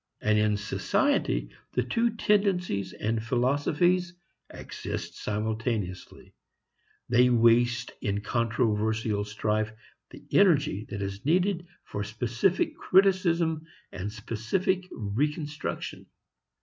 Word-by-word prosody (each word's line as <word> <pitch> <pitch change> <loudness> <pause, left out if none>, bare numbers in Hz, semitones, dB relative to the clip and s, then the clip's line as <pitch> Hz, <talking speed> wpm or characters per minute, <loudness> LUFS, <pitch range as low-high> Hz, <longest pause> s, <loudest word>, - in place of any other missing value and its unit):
And 105 0 +2
in 105 -1 +2
society - - 0 0.2
the 125 - +1
two 230 - 0
tendencies 180 - +1
and 110 +3 -2
philosophies 150 +9 +1 0.3
exist - - -6
simultaneously; 105 -3 -3 0.7
they 125 +1 +5
waste 120 +1 +3
in 100 -3 -1
controversial 110 -2 0
strife 105 +1 -1 0.4
the - - -13
energy 145 - +3
that 100 -1 -4
is 100 +1 -5
needed 175 +3 +1 0.2
for 100 - -4
specific 120 - 0
criticism 175 -4 +2 0.2
and 100 +3 -5
specific 175 - -1
reconstruction. 145 +8 -3
120 Hz, 95 wpm, -28 LUFS, 105-170 Hz, 0.7 s, they